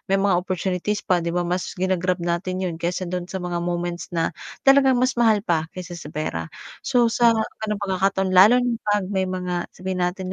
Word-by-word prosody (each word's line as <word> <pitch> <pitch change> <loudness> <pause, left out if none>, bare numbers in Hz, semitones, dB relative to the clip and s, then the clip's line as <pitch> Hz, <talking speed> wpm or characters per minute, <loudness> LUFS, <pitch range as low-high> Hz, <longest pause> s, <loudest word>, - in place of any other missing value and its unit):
may 195 - +3
mga 195 -2 +2
opportunities 185 +2 -2
pa, 180 -2 +2
'di 170 - -3
ba 175 - +1
mas 180 +2 -3
ginag-grab 185 0 0
natin 185 +2 -2
'yon 170 -2 -4
kaysa 175 +2 -2
do'n 180 0 -4
sa - - -5
mga 175 -1 -2
moments 175 0 -3
na 165 0 0 0.3
talagang 270 -1 +6
mas 255 +2 +2
mahal 215 -3 +3
pa 160 -4 0
kaysa 180 -1 -7
sa 150 - -9
pera. 85 - -4 0.3
So 240 -2 +2
sa 235 -1 +5
gano'ng 220 -1 -3
pagkakataon 190 0 0
lalo 195 +7 +7
na 240 -2 -1
'pag 205 -2 +2
may 190 -1 0
mga, 180 -1 -3
sabihin 185 0 -3
natin, 185 +1 -2
185 Hz, 200 wpm, -23 LUFS, 175-200 Hz, 0.3 s, lalo